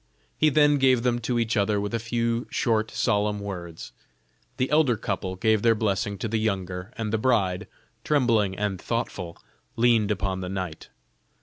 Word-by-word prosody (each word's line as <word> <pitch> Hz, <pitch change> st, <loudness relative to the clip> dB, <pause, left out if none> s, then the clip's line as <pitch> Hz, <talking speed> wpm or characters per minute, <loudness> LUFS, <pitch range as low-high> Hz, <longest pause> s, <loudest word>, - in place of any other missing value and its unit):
He 155 Hz, -, +3 dB
then 145 Hz, -1 st, +4 dB
gave 130 Hz, -3 st, +4 dB
them 120 Hz, -1 st, +1 dB
to 120 Hz, +1 st, -1 dB
each 115 Hz, 0 st, 0 dB
other 105 Hz, 0 st, +1 dB
with 105 Hz, +2 st, -3 dB
a 115 Hz, -, 0 dB
few 115 Hz, +1 st, -1 dB
short 110 Hz, -2 st, 0 dB
solemn 105 Hz, -2 st, 0 dB
words; 90 Hz, -5 st, -7 dB, 0.7 s
the 130 Hz, +2 st, -1 dB
elder 150 Hz, -7 st, +3 dB
couple 95 Hz, -2 st, -3 dB
gave 110 Hz, +2 st, +2 dB
their 115 Hz, 0 st, +4 dB
blessing 100 Hz, -2 st, -1 dB
to 115 Hz, -, -3 dB
the 110 Hz, 0 st, -1 dB
younger, 95 Hz, -2 st, -3 dB
and 110 Hz, -1 st, -3 dB
the 110 Hz, -, +1 dB
bride, 105 Hz, -6 st, +1 dB, 0.4 s
trembling 115 Hz, -10 st, +2 dB
and 100 Hz, -3 st, -2 dB
thoughtful, 95 Hz, -7 st, -3 dB, 0.4 s
leaned 115 Hz, -3 st, +3 dB
upon 95 Hz, -2 st, -1 dB
the 90 Hz, -, -4 dB
knight. 90 Hz, -4 st, -5 dB
110 Hz, 170 wpm, -25 LUFS, 100-120 Hz, 0.7 s, then